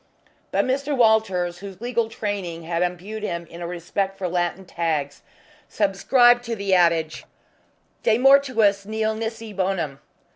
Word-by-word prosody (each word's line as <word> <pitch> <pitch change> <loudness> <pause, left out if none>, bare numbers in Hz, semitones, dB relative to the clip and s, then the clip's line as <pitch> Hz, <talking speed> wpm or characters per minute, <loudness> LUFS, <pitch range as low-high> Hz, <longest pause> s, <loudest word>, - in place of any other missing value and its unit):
But - - +1
Mr. 275 +2 -1
Walters, 190 -7 +2
whose 195 -1 -9
legal 235 -1 -1
training 195 -7 -4
had 170 +1 -2
imbued 180 +5 -3
in 170 -4 -3
him 170 +1 -11
a 170 - -4
respect 185 +3 -3
for 190 -2 -2
Latin 175 +2 -2
tags, 155 -5 -2 0.5
subscribed 240 +5 +3
to 230 -1 -3
the 200 -2 -1
adage, 170 -3 +2 0.8
de 225 -1 +3
mortuis 255 -7 +4
nil 220 +1 -1
nisi 225 0 -5
bonum. 185 -8 -2
195 Hz, 140 wpm, -23 LUFS, 175-225 Hz, 0.8 s, mortuis